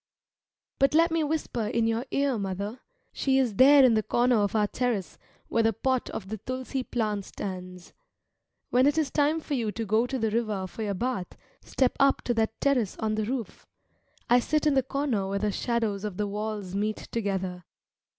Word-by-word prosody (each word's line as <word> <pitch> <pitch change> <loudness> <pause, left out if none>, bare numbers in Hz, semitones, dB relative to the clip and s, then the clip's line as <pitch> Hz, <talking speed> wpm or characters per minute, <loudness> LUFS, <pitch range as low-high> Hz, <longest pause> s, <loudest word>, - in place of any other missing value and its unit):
But 275 +2 +3
let 330 +1 +5
me 330 -1 +1
whisper 290 -7 -2
in 230 +1 +1
your 230 +3 -1
ear, 275 -4 0
mother; 200 +4 -4 0.3
she 265 -1 +1
is 245 -7 +1
there 275 +1 +8
in 245 - +5
the 220 - +3
corner 240 +2 +2
of 205 0 0
our 210 -1 +3
terrace 230 -3 -2 0.3
where 230 - +1
the 225 0 +2
pot 260 +4 -1
of 190 -2 -6
the 220 0 -5
tulsi 255 +3 -4
plant 215 -5 -2
stands. 180 -2 -7 0.8
When 255 +2 +4
it 295 +2 +2
is 305 -4 +1
time 300 +2 +2
for 305 - -5
you 230 -5 0
to 225 - -3
go 220 +4 +2
to 265 - -2
the 225 -3 0
river 215 -4 -1
for 185 +4 -8
your 205 -2 -1
bath, 240 -3 -3 0.2
step 260 -2 0
up 275 0 +3
to 240 - 0
that 225 -1 -1
terrace 255 -8 +1
on 220 -1 -1
the 215 0 -1
roof. 240 -1 -5 0.6
I 245 +1 +5
sit 305 +5 0
in 300 - +4
the 270 - +4
corner 260 -7 -1
where 200 - -1
the 210 +1 0
shadows 220 -2 -1
of 205 -4 -4
the 210 - 0
walls 210 -2 -4
meet 210 +2 -1
together. 190 -5 -2
225 Hz, 200 wpm, -27 LUFS, 205-260 Hz, 0.8 s, there